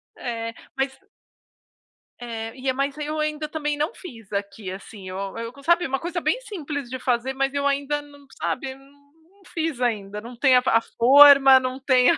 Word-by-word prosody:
É, 230 -1 -4 0.2
mas 270 0 -2 1.2
É, 225 -1 -6
e 260 0 -1
mas 275 +2 -2
aí, 300 - -4
eu 310 0 -3
ainda 305 0 -2
também 295 -2 -2
não 300 +4 -1
fiz 225 - -12
aqui, 200 -1 -4
assim, 190 0 -9
eu 185 - -6 0.2
eu 230 +1 -5
c 280 - -15
sabe, 340 +1 +3
uma 270 0 -1
coisa 345 0 -4
bem - - +1
simples 300 - -6
de 260 +1 -5
fazer, 250 +1 0
mas 270 +1 -1
eu 280 0 -1
ainda 280 +1 0
não, 285 -1 -17
sabe, 265 +1 -3
não 285 +1 -22 0.3
não - - -19
fiz 320 -6 -2
ainda, 210 -3 -2
não 235 +1 -10
tem 260 -1 +5
a 250 - +6
a 225 - +4
forma, 270 +2 +7
não 255 +1 -4
tem 255 -2 +4
a - - +1
270 Hz, 195 wpm, -24 LUFS, 235-290 Hz, 1.2 s, forma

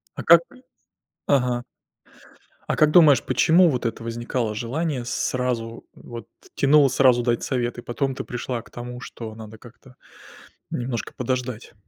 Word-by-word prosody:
А - - -5
как... 170 0 +8 0.9
Ага. 125 -3 +1 1.0
А - - -1
как 155 -1 +4
думаешь, 150 -8 +6
почему 165 +8 +4
вот 125 -5 -1
это 115 0 -4
возникало 115 -1 -3
желание 130 +3 -3
сразу 120 -2 -3
вот 115 -4 -10 0.3
тянуло 140 0 +5
сразу 125 -1 +4
дать 120 -1 0
совет, 120 -2 -2
и - - -6
потом 135 +3 -2
ты - - -6
пришла 125 -1 -4
к - - -20
тому, 125 0 -8
что 115 -3 -8
надо 110 0 -11
как-то 125 +2 -17 0.8
немножко 120 -2 -4
подождать? 125 -2 -4
125 Hz, 140 wpm, -23 LUFS, 120-130 Hz, 1.0 s, как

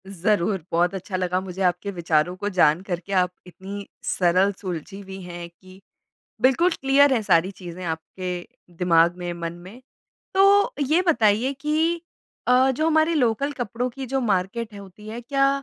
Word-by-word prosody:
ज़रूर। 195 -1 0
बहुत 175 +2 +2
अच्छा 190 0 -5
लगा 180 0 0
मुझे 190 0 -7
आपके 180 +2 0
विचारों 170 -1 0
को 205 +2 -3
जान 175 -4 +3
करके, 180 0 -5
आप 180 -2 +2 0.2
इतनी 195 +3 -8 0.2
सरल 185 +2 +2
सुलझी 185 +1 -6
हुई 195 -1 -9
हैं 175 -1 -8
कि 185 +2 -18 0.6
बिल्कुल 270 +8 +4
क्लियर 275 -1 +4
है 235 - +1
सारी 180 -1 +3
चीज़ें 180 -2 -9
आपके 175 +2 -5 0.3
दिमाग 170 -1 +4
में, 175 -1 -4
मन 170 -1 -5
में। 185 +8 -13 0.5
तो 400 +4 +5
ये 320 +6 +3
बताइए 235 -4 +3
कि 320 +3 0 0.5
अ, 255 +1 +5
जो 310 +5 0
हमारे 320 +1 +3
लोकल 260 0 +1
कपड़ों 245 -1 -3
की 270 +2 -7
जो 270 0 +1
मार्केट 210 +3 -1
होती 200 +1 -12
है 225 +2 -6
क्या 275 +3 +2
195 Hz, 160 wpm, -24 LUFS, 180-255 Hz, 0.6 s, तो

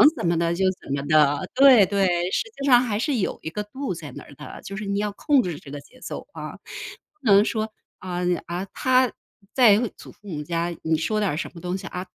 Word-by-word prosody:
怎 170 - -2
么 170 - +2
的 170 0 +1
就 190 +2 0 0.2
怎 - - -9
么 140 - -1
的。 150 -2 +3
对 260 -7 +8
对， 200 0 +1 0.3
实 - - +1 0.2
际 275 - -2
上 250 -3 +6
还 220 -5 -1
是 285 +2 0
有 200 - -2
一 160 - -5
个 210 +5 -4
度 260 +2 -5
在 160 -5 -8
那 - - -8
儿 - - -15
的， - - -10
就 195 - -7
是 210 - -5
你 200 0 -1
要 210 0 -1
控 275 +6 +2
制 170 -5 -4
这 140 - -13
个 145 - -6
节 255 - -20
奏 - - -7
啊。 - - -7 0.6
不 - - -19
能 200 +1 +7
说 220 -1 -2 0.3
啊， 180 -1 -4 0.3
啊， 175 +2 -4
他 255 -2 +3 0.4
在 225 -6 +6 0.2
祖 - - -12
父 210 - -19
母 150 -5 -4
家 170 +2 -2
你 160 0 +1
说 215 +7 -1
点 205 -5 +1
儿 - - -2
什 - - -4
么 170 - -10
东 180 +1 -3
西， 190 - -8
啊， 180 +1 -5
195 Hz, 260 characters per minute, -24 LUFS, 170-220 Hz, 0.6 s, 对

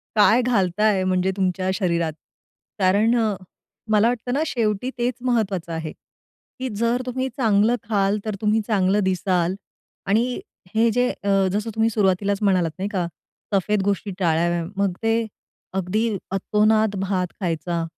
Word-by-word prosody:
काय 220 +3 +5
घालताय 205 -3 +2
म्हणजे 185 0 +1
तुमच्या 185 0 0
शरीरात? 170 -5 0 0.7
कारण 205 +5 +3
अ, 215 -3 +1 0.6
मला 215 +1 +5
वाटतं 245 0 -2
ना, 290 +4 +1
शेवटी 220 0 -1
तेच 245 +1 0 0.2
महत्त्वाचं 195 -7 -1
आहे, 160 -1 -4
की 260 0 -11
जर 235 +3 +1
तुम्ही 260 +1 -2
चांगलं 220 -1 +3
खाल 200 -1 +2
तर 215 -2 -2
तुम्ही 215 +1 +2
चांगलं 200 -1 +2
दिसाल 185 -1 +1 0.5
आणि 235 - +1 0.3
हे 230 +1 +4
जे 245 +2 +2
अ, 200 - -1 0.2
जसं 210 +2 -1
तुम्ही 225 0 +3
सुरुवातीलाच 200 -1 +1
म्हणालात 185 -5 +2
नाही 195 +2 -2
का, 180 -3 0 0.5
सफेद 200 +1 +2
गोष्टी 200 0 -1
टाळाव्या. 170 0 +1
मग 200 -2 +1
ते 225 0 +1 0.5
अगदी 190 +2 -1 0.3
अतोनात 215 +2 +2
भात 190 -2 0
खायचा 170 -1 -1
200 Hz, 140 wpm, -23 LUFS, 185-225 Hz, 0.7 s, काय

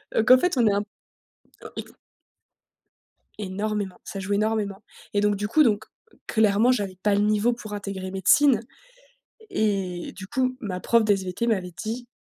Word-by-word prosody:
Heu, 225 - +3
qu'en 255 +3 +8
fait, 340 +1 0
on 235 -3 +4
est 200 - +3
un, 200 - +1 0.8
heu, - - -8
ik - - -6 1.5
Énormément, 205 -1 -3
ça 195 - -7
joue 195 +1 -2
énormément. 210 -1 -1 0.3
Et 205 - +2
donc, 205 0 +2
du 205 +1 -3
coup, 305 +8 +4
donc 220 -3 +1 0.4
clairement, 220 +2 +3
j'avais 195 -6 -2
pas 210 -1 +3
le 205 - +2
niveau 215 +3 +2
pour 215 -3 -9
intégrer 195 -2 -5
médecine 220 +6 +4 0.9
et 195 - -1
du 190 0 -9
coup, 255 +2 -1
ma 185 -4 -4
prof 230 +4 +3
de 210 -1 +4
SVT 190 +3 -3
m'avait 185 -5 -1
dit: 235 +3 -5
210 Hz, 165 wpm, -25 LUFS, 195-225 Hz, 1.5 s, qu'en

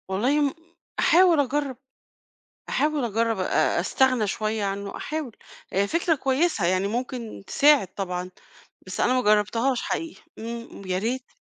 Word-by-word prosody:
والله 250 +10 +1
م 280 -2 +1 0.5
أحاول 350 -2 +5
أجرّب، 280 -1 -1 0.9
أحاول 300 -3 0
أجرب 225 -1 0
أ 185 - +1
أستغنى 255 -5 +2
شوية 215 +1 -2
عنه 200 0 -4
أحاول، 305 -7 -5 0.5
فكرة 335 - +1
كويسة 270 - +1
يعني 185 +2 +1
ممكن 240 -2 -5
تساعد 290 -8 +4
طبعًا، 180 -2 -3 0.6
بس 185 - -5
أنا 250 - +3
ما 255 - +2
جرّبتهاش 230 +4 +2
حقيقي، 330 -1 -4 0.2
إمم، 230 -1 -7
يا 185 0 0
ريت. 250 +6 -3
240 Hz, 130 wpm, -25 LUFS, 205-285 Hz, 0.9 s, أحاول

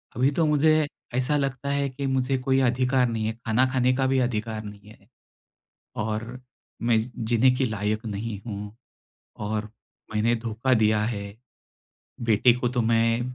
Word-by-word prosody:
अभी 130 +3 +3
तो 165 - +4
मुझे 155 +1 +3 0.3
ऐसा 130 +4 +1
लगता 135 -1 -2
है 140 0 0
कि 135 +2 -5
मुझे 130 0 +1
कोई 130 +1 +1
अधिकार 125 +1 +2
नहीं 110 -1 -2
है, 110 - -1
खाना 115 +3 +3
खाने 130 0 +3
का 135 0 +1
भी 135 0 +2
अधिकार 110 -3 -2
नहीं 105 0 -11
है, 100 -2 -18 0.9
और 110 +3 -3 0.4
मैं 115 -1 +3 0.3
जीने 120 +3 +4
के 130 - +1
लायक 110 0 -2
नहीं 105 0 -4
हूँ, 105 -1 -6 0.6
और 105 0 -3 0.4
मैंने 110 +2 +2
धोखा 115 +3 +1
दिया 110 -2 +3
है। 105 -3 -3 1.0
बेटे 115 +2 +4
को 125 +1 -1
तो 125 0 0
मैं 115 +1 +2
120 Hz, 155 wpm, -25 LUFS, 110-130 Hz, 1.0 s, तो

